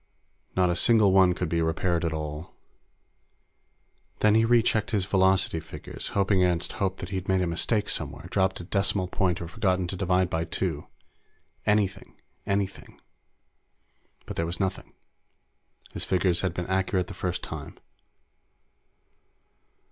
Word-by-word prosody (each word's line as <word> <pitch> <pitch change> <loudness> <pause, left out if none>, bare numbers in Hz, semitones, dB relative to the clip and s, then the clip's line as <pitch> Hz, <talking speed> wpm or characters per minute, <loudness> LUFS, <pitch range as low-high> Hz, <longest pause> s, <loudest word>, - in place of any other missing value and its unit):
Not 90 -1 +3
a - - 0
single 110 +1 +4
one 95 -1 +5
could 90 0 -2
be 85 +1 0
repaired 80 +1 0
at 85 - 0
all. 75 0 -5 1.7
Then 105 -1 +5
he 110 +1 +4
rechecked 115 -2 +3
his 100 -5 0
velocity 95 -3 +2
figures, 80 - -6
hoping 100 -1 +3
against 90 -1 +1
hope 95 -1 -2
that 90 - -7
he'd 95 -1 -4
made 95 -1 +2
a - - +1
mistake 100 +5 0
somewhere, - - -2
dropped 95 -1 +1
a - - -6
decimal 95 +1 0
point 90 -2 0
or - - -6
forgotten 95 -1 0
to 95 - -3
divide 90 0 +1
by 80 -1 -1
two. 85 -3 -2 0.8
Anything. 105 -2 0 0.3
Anything! 100 0 -3 1.3
But - - -7
there 85 - 0
was 85 0 -3
nothing. 95 -1 -3 1.0
His - - -4
figures 90 -2 +1
had 90 -3 -2
been 90 - -3
accurate 95 0 0
the - - -9
first 90 -1 -3
time. - - -7
95 Hz, 145 wpm, -27 LUFS, 85-100 Hz, 1.7 s, one